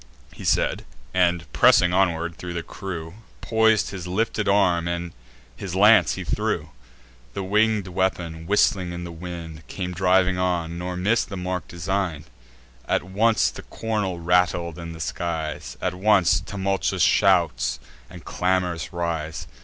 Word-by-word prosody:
He - - -11
said; - - +1 0.3
and, 90 -2 +2
pressing 90 0 +5
onward 85 -3 +1
thro' 90 -1 -6
the 85 -1 -3
crew, 85 -5 -7 0.3
Pois'd 110 -1 +2
in - - -4
his 90 -1 -7
lifted 105 +2 -1
arm, 85 -3 +1 0.4
his 95 -3 -6
lance 105 +3 +6
he 95 - -5
threw. 70 -7 -2 0.6
The 100 - -3
winged 105 +1 +2
weapon, 85 -3 -2
whistling 95 -3 +2
in 85 0 -6
the 85 - -7
wind, 85 -2 -8
Came 90 -2 -4
driving 90 0 +2
on, 85 -2 -1
nor 90 0 -4
miss'd 105 +6 +1
the 100 - -5
mark 90 -2 -3
design'd. 85 -3 -3 0.6
At - - +1
once 110 +5 +2
the - - -9
cornel 105 -6 -3
rattled 85 -1 +1
in 85 -1 -7
the 80 - -10
skies; 80 -2 -4
At 90 - 0
once 95 -2 +3
tumultuous 95 0 -1
shouts 80 -11 +3 0.3
and 85 -3 -12
clamours 90 -4 -1
rise. 80 -2 -3
90 Hz, 145 wpm, -24 LUFS, 85-95 Hz, 0.6 s, lance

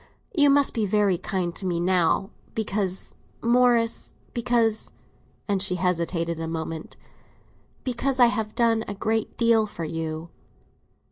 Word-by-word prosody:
"You 290 -3 +5
must 280 0 +4
be 220 -3 0
very 200 -3 +2
kind 180 -4 -2
to - - -2
me 175 -2 0
now, 180 +1 +2 0.2
because, 200 -3 -1 0.3
Morris—because," 235 -1 +1 0.6
and 200 -2 +1
she 185 -2 +1
hesitated 170 -2 0
a 165 - -3
moment—"because 200 - -6
I 245 - +9
have 220 -2 -1
done 230 -2 +2
a 205 - -4
great 220 +2 -1
deal 230 -2 +3
for 170 -5 -7
you." 160 0 -4
205 Hz, 125 wpm, -25 LUFS, 175-230 Hz, 0.6 s, I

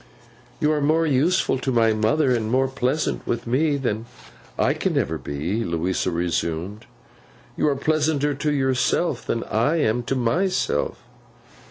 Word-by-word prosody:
'You 155 -1 +2
are 150 -1 0
more 160 +3 +2
useful 150 0 +2
to 130 - -2
my 115 -2 +3
mother, 115 +7 +2
and 110 -3 -1
more 130 +2 +2
pleasant 130 +3 -1
with 120 0 -1
her 140 +5 +1
than 115 -4 -2 0.5
I - - +2
can - - -1
ever - - -1
be,' 85 +11 -3
Louisa 85 +1 -1
resumed. 85 +3 -2 0.7
'You - - +1
are 145 - +2
pleasanter 150 0 +1
to 150 +2 -1
yourself, 130 0 +1
than 115 - -1
I 120 +9 +1
am 120 -7 +1
to 135 - -1
_my_self. 145 - 0
130 Hz, 150 wpm, -23 LUFS, 110-150 Hz, 0.7 s, my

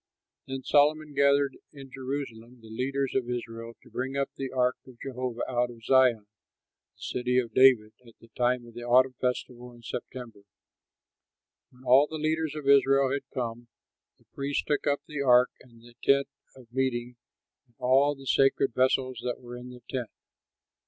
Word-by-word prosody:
Then 135 0 -5
Solomon 150 +2 +3
gathered 140 0 +3
in 135 -3 -12
Jerusalem 125 -3 -6
the 110 - -14
leaders 135 +3 -2
of 125 -2 -1
Israel 115 -1 -5
to - - -18
bring 135 +2 -3
up 140 0 -1
the 135 -1 -4
ark 125 -1 +1
of 130 -2 -14
Jehovah 125 -2 -4
out 125 -1 0
of 115 -1 -13
Zion, 125 -4 +4 0.7
the - - -32
City 125 0 -1
of 120 -3 0
David, 125 -5 +5
at 115 - -16
the 115 - -18
time 125 0 0
of 120 - -14
the 120 - -8
autumn 125 +2 +4
festival 125 -1 -3
in 120 -1 -17
September. 120 -3 -7 1.3
When 125 0 -20
all 130 +4 +6
the 160 - -7
leaders 155 0 -1
of 150 -2 -6
Israel 135 -1 +5
had 140 -1 -3
come, 120 -1 -4 0.5
the - - -30
priests 140 +1 -2
took 145 - -1
up 145 0 +1
the 150 -2 -5
ark 125 -2 +5
and 115 -2 -19
the 120 0 -16
tent 140 0 +4 0.3
of 120 -3 -17
meeting 125 -2 -1 0.5
and 120 - -34
all 135 +3 +3
the 135 0 -13
sacred 135 -1 +2
vessels 130 -1 +1
that 125 -1 -3
were 120 -1 -9
in 125 +1 -9
the 125 -1 -12
tent. 125 -4 -4
130 Hz, 175 wpm, -28 LUFS, 120-135 Hz, 1.3 s, all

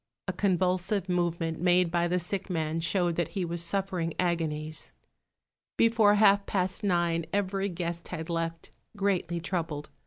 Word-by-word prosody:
A 185 - -1
convulsive 185 +1 +1
movement 170 -2 -1
made 180 -1 +3
by 175 0 +2
the 180 +1 +1
sick 185 +3 -3
man 160 -2 -1
showed 175 0 +1
that 170 -3 -1
he 185 - 0
was 170 0 -4
suffering 180 -2 -1
agonies. 155 -3 -1 0.8
Before 225 -3 +5
half 200 -1 +5
past 185 0 -1
nine 170 -4 +1
every 195 0 0
guest 170 -1 -4
had 160 -3 -5
left, 165 -1 -3 0.3
greatly 185 -4 0
troubled. 165 -4 -3
175 Hz, 145 wpm, -29 LUFS, 165-190 Hz, 0.8 s, Before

